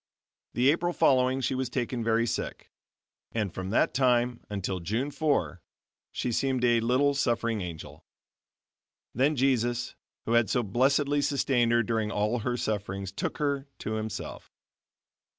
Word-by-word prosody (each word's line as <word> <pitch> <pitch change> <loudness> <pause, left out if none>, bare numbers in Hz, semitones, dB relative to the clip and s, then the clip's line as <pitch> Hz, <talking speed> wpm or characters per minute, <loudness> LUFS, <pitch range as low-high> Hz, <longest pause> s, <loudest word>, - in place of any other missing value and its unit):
The 130 +3 +5
April 175 +2 0
following 130 -4 +3
she 125 - 0
was 130 -1 -2
taken 125 -1 -2
very 115 +1 +2
sick, - - -4 0.6
and 105 -6 -1
from 95 0 -5
that 110 - +2
time 125 -2 +2
until 95 -2 -3
June 110 - -2
4, 140 - 0 0.5
she 125 - -2
seemed 130 +1 0
a 120 -1 +4
little 130 +5 +2
suffering 115 -5 0
angel. 85 -3 -8 1.1
Then 140 +6 +2
Jesus, 125 -2 +1 0.3
who - - -2
had 115 -2 +3
so 125 - +1
blessedly 140 +7 +2
sustained 130 -4 +1
her 120 0 +4
during 110 -1 -1
all 105 +3 0
her 120 +2 -2
sufferings 100 -3 -3
took 100 - -3
her 140 -2 -1
to 110 - -5
Himself. 110 0 -5
120 Hz, 145 wpm, -28 LUFS, 110-135 Hz, 1.1 s, The